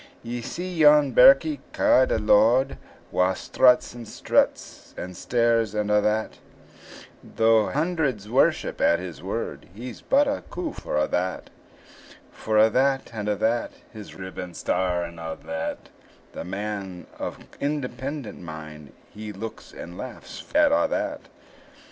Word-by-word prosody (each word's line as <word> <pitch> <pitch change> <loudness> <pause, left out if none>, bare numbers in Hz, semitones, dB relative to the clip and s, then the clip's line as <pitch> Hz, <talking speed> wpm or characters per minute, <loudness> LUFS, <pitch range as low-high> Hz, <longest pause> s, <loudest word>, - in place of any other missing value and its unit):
Ye 120 +1 -5
see 175 +8 -5
yon 150 -2 +6
birkie 140 +4 +6
ca'd 130 - +4
a - - +2
lord, 115 +5 +3 0.3
Wha 90 +1 +2
struts, 125 +5 +3
and 120 -2 -9
stares, - - -1 0.8
and 105 0 -1
a' 105 0 +4
that 110 +1 -1 0.8
Though 110 -1 +3
hundreds 150 - -1
worship 125 +5 +1
at 85 - +4
his 85 -5 -8
word, - - -5
He's 120 +2 -8
but 285 +1 +3
a 285 +1 -2
coof 340 -4 -5
for - - -3
a' 75 - +2
that; 90 +1 -2 0.8
For 110 -1 -2
a' 110 +1 +6
that, 135 +2 +1
and 105 -2 -3
a' 105 - +1
that, 115 +3 0 0.2
His 105 -2 -10
riband, 95 -2 -7
star, 90 -2 0
and 85 0 -8
a' 80 -1 -5
that; 80 0 -5 0.4
The - - -7
man 95 -1 -5
of - - -4 0.2
independent 140 -2 -4
mind, 75 -3 -9 0.2
He 105 0 -7
looks 110 +3 -8
and 85 +1 -10
laughs 130 -1 -8
at 300 -1 +5
a' 295 0 +3
that. 305 -1 -3
110 Hz, 140 wpm, -25 LUFS, 95-140 Hz, 0.8 s, yon